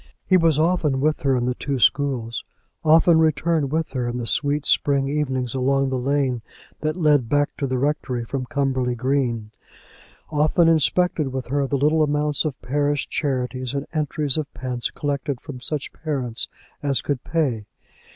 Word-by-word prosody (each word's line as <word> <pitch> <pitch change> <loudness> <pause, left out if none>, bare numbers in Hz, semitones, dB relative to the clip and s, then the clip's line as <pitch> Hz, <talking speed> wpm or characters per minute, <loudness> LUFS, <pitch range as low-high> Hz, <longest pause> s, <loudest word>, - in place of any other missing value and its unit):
He 185 - +4
was 165 -4 +4
often 155 -4 +2
with 150 +2 +1
her 135 -2 +2
in 120 - 0
the 125 - 0
two 140 +2 -3
schools; 125 -3 +1 0.4
often 160 +1 +5
returned 155 -2 +1
with 160 0 -1
her 125 -2 -2
in 120 0 -3
the 120 - -3
sweet 145 +4 0
spring 140 -1 +2
evenings 130 -4 -1
along 135 +1 +1
the 130 - -1
lane 135 -2 0 0.4
that 155 0 -1
led 145 -8 +3
back 145 0 +1
to 140 - -1
the 130 0 -1
rectory 130 -3 -1
from 130 +1 -4
Cumberly 130 -3 0
Green; 120 -4 -1 0.8
often 155 +3 +3
inspected 165 0 +2
with 130 -1 -4
her 140 0 +1
the 140 - 0
little 150 +3 +3
amounts 150 0 +1
of 145 -4 -3
parish 145 +3 0
charities 130 -2 -2
and 140 +1 -2
entries 150 -2 0
of 150 - -4
pence 125 -2 -2
collected 140 -2 -3
from 130 -3 -9
such 145 +2 -4
parents 130 -7 -3 0.3
as 140 -2 0
could 140 -4 -2
pay. 130 -11 -1
140 Hz, 170 wpm, -23 LUFS, 130-150 Hz, 0.8 s, often